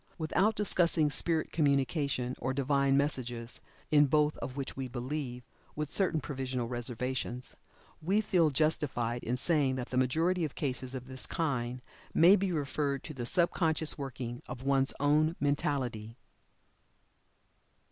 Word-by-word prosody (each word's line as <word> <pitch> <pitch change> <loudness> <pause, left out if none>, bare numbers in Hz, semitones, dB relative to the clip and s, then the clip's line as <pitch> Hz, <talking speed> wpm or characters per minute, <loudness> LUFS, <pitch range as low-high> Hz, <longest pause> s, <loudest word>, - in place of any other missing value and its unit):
Without 190 +7 +1
discussing 170 -7 +3
spirit 160 +1 0
communication, 140 -3 +1
or 130 +1 -2
Divine 140 0 +2
messages, 125 -5 -1 0.3
in 145 -1 +6
both 150 +1 +2
of 130 - -6
which 135 - -4
we 130 -1 -4
believe 125 0 -4 0.3
(with 150 -1 -3
certain 180 -5 +1
provisional 130 -4 -3
reservations) 125 +1 -3 0.5
we 190 +7 +2
feel 180 -7 +3
justified 130 -5 0
in 125 +2 -1
saying 145 -3 +2
that 125 -2 -4
the 130 - -1
majority 165 +8 +2
of 150 - -3
cases 130 -2 -2
of 125 -1 -6
this 130 0 -6
kind 125 -6 -2 0.3
may 175 +4 +8
be 195 -2 0
referred 140 -2 -1
to 155 - -7
the 120 -4 -4
sub 175 +3 +2
conscious 160 -2 +1
workings 125 -4 -6
of 125 0 -7
one's 135 0 +3
own 155 +3 +3
mentality. 130 -6 -1
140 Hz, 140 wpm, -31 LUFS, 125-155 Hz, 0.5 s, may